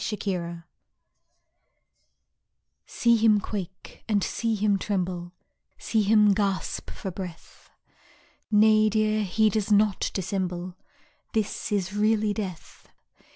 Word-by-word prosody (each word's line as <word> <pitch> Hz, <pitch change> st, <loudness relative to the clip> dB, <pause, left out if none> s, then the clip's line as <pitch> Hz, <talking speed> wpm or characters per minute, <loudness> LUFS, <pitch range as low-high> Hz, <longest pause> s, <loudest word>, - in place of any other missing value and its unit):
LOVE'S 210 Hz, -, -5 dB
BURIAL 170 Hz, -3 st, -3 dB, 2.2 s
See 235 Hz, -1 st, +2 dB
him 215 Hz, -1 st, +4 dB
quake 190 Hz, -3 st, -7 dB
and 205 Hz, -3 st, +2 dB
see 230 Hz, -1 st, -1 dB
him 205 Hz, -1 st, +1 dB
tremble, 180 Hz, -3 st, -3 dB, 0.5 s
See 220 Hz, -, 0 dB
him 210 Hz, 0 st, +5 dB
gasp 195 Hz, -2 st, -2 dB
for 190 Hz, -, -6 dB
breath. 175 Hz, -2 st, -10 dB, 0.8 s
Nay, 215 Hz, 0 st, +5 dB
dear, 215 Hz, 0 st, +1 dB
he 215 Hz, +3 st, +2 dB
does 215 Hz, +1 st, -1 dB
not 210 Hz, -1 st, +3 dB
dissemble, 185 Hz, -2 st, -3 dB, 0.6 s
This 215 Hz, -2 st, -2 dB
is 195 Hz, -2 st, -1 dB
really 215 Hz, 0 st, +2 dB
Death. 190 Hz, -6 st, -7 dB
205 Hz, 110 wpm, -26 LUFS, 185-215 Hz, 2.2 s, him